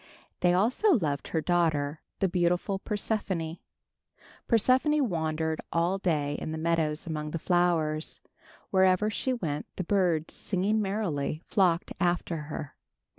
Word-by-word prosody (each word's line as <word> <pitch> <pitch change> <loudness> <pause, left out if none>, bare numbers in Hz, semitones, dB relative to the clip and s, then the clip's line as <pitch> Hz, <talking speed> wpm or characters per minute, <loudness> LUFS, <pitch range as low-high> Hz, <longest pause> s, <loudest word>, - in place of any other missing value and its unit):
They 180 - +4
also 255 - +3
loved 150 - -1
her 160 - -1
daughter, 155 -4 +1 0.2
the 195 - +4
beautiful 180 +2 +1
Persephone. 195 -6 -2 0.9
Persephone 260 +5 +3
wandered 160 -2 -1
all 175 +3 +1
day 150 -6 0
in - - -4
the 160 - -3
meadows 160 -1 0
among 155 -2 -3
the 165 - -3
flowers. 165 -3 +1 0.5
Wherever 190 +2 +4
she 260 - -1
went 160 - -3
the 185 - -2
birds, 175 -4 +1
singing 205 +3 0
merrily, 180 -7 -2
flocked 180 -5 +2
after 175 -1 0
her. 145 -2 -6
175 Hz, 125 wpm, -28 LUFS, 160-195 Hz, 0.9 s, They